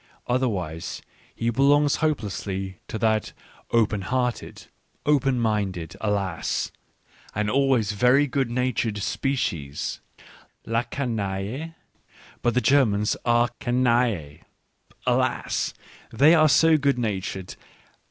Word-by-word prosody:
Otherwise 100 -11 -2 0.3
he 115 0 0
be 120 - -1
longs 145 +1 +4
hopelessly 100 - -2
to - - -4
that 110 -1 0 0.4
open 105 -3 +2
hearted, 125 +4 -2 0.4
open 135 -3 +2
minded 100 -7 -1
— - - -17
alas! 100 -5 -1 0.6
and 105 0 0
always 130 -6 +2
very 125 +7 +4
good 135 -2 -1
natured 120 -3 -1
species, 95 - -2 0.7
la 115 +1 +1
canaille! 120 +4 -3 0.7
But 120 - +1
the 125 - +3
Germans 110 -8 +3
are 120 0 +3
canaille 120 - +1 0.4
— - - -31
alas! - - 0 0.4
they 140 +8 +5
are 155 -2 +5
so 160 +2 +5
good 140 -2 +2
natured 95 -5 -3
115 Hz, 110 wpm, -25 LUFS, 100-135 Hz, 0.7 s, they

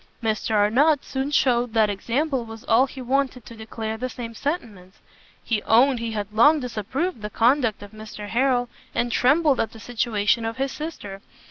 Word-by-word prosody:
Mr 220 0 -1
Arnott 265 +9 +3
soon 265 +1 -3
shewed 245 -5 +1
that 220 -1 +4
example 245 +7 -1
was 225 -1 -10
all 240 +4 +3
he 260 -1 -9
wanted 260 -2 -1
to 230 - -11
declare 220 0 -5
the 255 +3 -3
same 235 -2 -7
sentiments. 220 - -5 0.5
He 220 -3 -1
owned 245 +4 +4
he 230 -1 -4
had 210 -1 -4
long 295 +8 +5
disapproved 250 - -3
the 210 - -4
conduct 235 -1 +2
of 205 - -11
Mr 215 -1 -9
Harrel, 245 +1 +1 0.3
and 240 0 0
trembled 290 +3 +3
at 225 - -1
the 225 - -12
situation 225 -2 0
of 225 0 -3
his 270 0 -1
sister. 205 -11 -7
235 Hz, 175 wpm, -23 LUFS, 220-265 Hz, 0.5 s, long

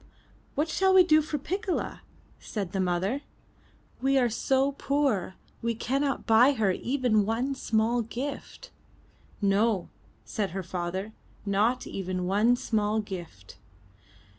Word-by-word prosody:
'What 300 +3 +1
shall 380 +4 +2
we 370 - +9
do 310 -3 +5
for 305 0 -3
Piccola?'' 370 +6 -3 0.4
said 200 -5 -5
the 195 - -2
mother, 185 +8 0 0.8
we 270 +1 +3
are 245 -3 +3
so 265 +4 +1
poor, 275 -10 0 0.3
we 230 0 -1
cannot 275 +4 -1
buy 240 +5 +6
her 215 -7 +2
even 245 0 +1
one 230 +6 -1
small 230 -1 +1
gift." 270 - -6 0.7
'No," 200 -1 +2 0.4
said 205 -3 -2
her 190 - -3
father, 185 +4 -4 0.3
*'not 210 +5 +1
even 185 -1 -3
one 210 +6 +3
small 215 -2 0
gift." 175 - -8
225 Hz, 125 wpm, -28 LUFS, 195-275 Hz, 0.8 s, we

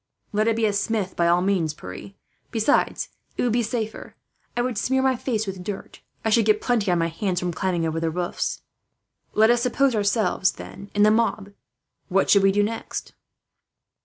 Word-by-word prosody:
"Let 215 +2 +2
it 225 - +3
be 225 -1 +1
a 210 - +1
smith, 205 -2 -1
by 170 - +2
all 175 +1 +3
means, 180 -6 +1
Pierre. 95 - -9 0.4
Besides, 230 +5 +1 0.3
it - - 0
would 245 - +2
be 240 +2 +2
safer. 220 -1 -4 0.4
I 240 - +2
would 250 -1 -2
smear 265 +1 +1
my 265 -1 +3
face 230 -3 -2
with 190 -2 -6
dirt. 200 +1 -7 0.2
I 220 - +2
should 225 0 +4
get 215 -1 +4
plenty 225 -5 0
on 175 - +3
my 165 - +1
hands 180 +2 -1
from 180 -1 -2
climbing 175 -1 -1
over 160 0 -1
the 165 0 0
roofs. 175 +2 -3 0.7
"Let 220 +2 +6
us 240 0 +2
suppose 260 +2 +2
ourselves, 205 -2 +1
then, 200 +1 -10
in 205 - +4
the 215 - +6
mob. 215 -3 0 0.6
What 195 0 +2
should 200 - +6
we 195 0 +5
do 205 +1 +2
next?" 225 +2 -4
205 Hz, 195 wpm, -24 LUFS, 185-230 Hz, 0.7 s, Let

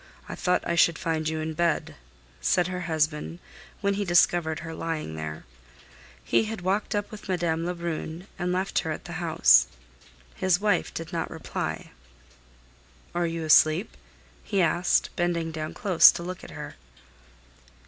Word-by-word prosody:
I - - -6
thought 180 - 0
I - - 0
should 170 -1 +4
find 160 -1 -1
you 160 0 -3
in 160 0 -3
bed," 170 +2 0 0.5
said 175 - +2
her 180 +1 -3
husband, 155 +1 -1 0.4
when 200 0 +1
he 205 +1 -1
discovered 175 -3 +2
her 165 0 -7
lying 160 - -4
there. 80 0 -6 0.8
He - - +2
had 215 -3 -5
walked 195 +4 -1
up 205 0 -2
with 210 -2 -10
Madame 170 -2 0
Lebrun 170 -1 -4
and 180 0 -1
left 185 +1 0
her 160 - -3
at 155 - -6
the - - -8
house. 160 - +5 0.7
His 185 -1 +1
wife 210 0 +1
did 165 0 -7
not 165 -1 -2
reply. - - -5 1.2
"Are 175 0 0
you 165 0 -4
asleep?" 155 +5 +4 0.5
he 200 - -1
asked, 175 0 +2
bending 170 -2 -1
down 155 -1 -5
close 190 -7 +7
to 170 - -6
look 180 +1 -6
at - - -10
her. - - -8
170 Hz, 160 wpm, -26 LUFS, 160-180 Hz, 1.2 s, close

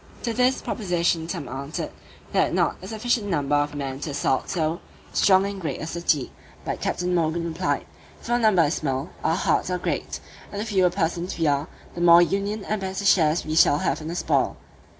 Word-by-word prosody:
To 230 - -1
this 255 +2 +2
proposition 170 -5 0
some 145 - -4
answered, 140 +4 -5 0.4
"they - - +3
had - - +2
not - - +2
a - - -8
sufficient 225 -1 -1
number 145 -6 0
of 145 0 0
men 135 -2 -4
to 150 - -4
assault 140 -2 0
so 165 -1 -1 0.3
strong 190 0 +4
and 200 -1 -5
great 150 -6 -3
a - - -4
city." 165 -4 0 0.3
But - - -3
Captain 180 0 -1
Morgan 170 0 0
replied, 170 +2 -1 0.3
"If - - -12
our 240 +1 +2
number 215 -7 +4
is 150 +1 +1
small, 135 -5 -2
our 165 - +2
hearts - - +1
are 180 - 0
great; - - -3 0.3
and 205 - -5
the 210 - -2
fewer 190 -5 +3
persons 175 0 -2
we 165 - 0
are, 145 +1 +1 0.3
the 170 - -5
more 170 0 +8
union 200 +3 -2
and 215 -1 -2
better 190 +1 -3
shares 165 -4 +4
we 155 - -3
shall 150 -2 +5
have - - -1
in 155 - -6
the 170 - -4
spoil." - - +1
170 Hz, 210 wpm, -24 LUFS, 155-195 Hz, 0.4 s, more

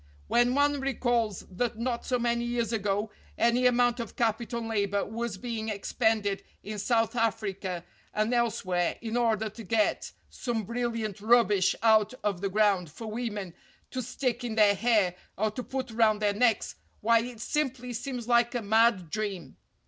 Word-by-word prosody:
When 240 +1 +3
one 285 0 +3
recalls 240 -6 0
that 215 +4 -3
not 235 +1 -2
so 250 - +2
many 235 0 0
years 240 -1 -1
ago 205 0 -1 0.3
any 240 +2 +3
amount 245 0 +3
of 230 -3 -6
capital 235 +1 0
and 225 - -5
labor 200 -2 0
was 230 -2 -4
being 225 0 -4
expended 210 -1 0 0.2
in 210 0 -5
South 225 +2 +1
Africa 195 -6 -1 0.3
and 215 +3 0
elsewhere 210 -7 0
in 225 0 -3
order 225 -3 +1
to 225 +2 -10
get 215 +1 0 0.2
some 230 -4 -3
bril 240 +3 -1
liant 215 -4 -3
rubbish 210 -4 +4
out 220 +1 +4
of 200 -4 -1
the 200 - 0
ground 200 -4 +2
for 225 +9 -9
women 210 -6 -4 0.4
to 255 - -2
stick 250 0 -2
in 235 -3 -3
their 210 -2 +6
hair 210 -4 +2 0.2
or 215 +2 +1
to 250 - -5
put 260 -1 -4
round 220 -2 +3
their 205 -1 +1
necks, 225 +1 +2 0.3
why 230 +2 +5
it 240 -1 -7
simply 255 -1 -2
seems 245 0 -5
like 240 0 +3
a 240 - -1
mad 215 -5 +3
dream. 205 -5 -4
225 Hz, 170 wpm, -28 LUFS, 205-240 Hz, 0.4 s, their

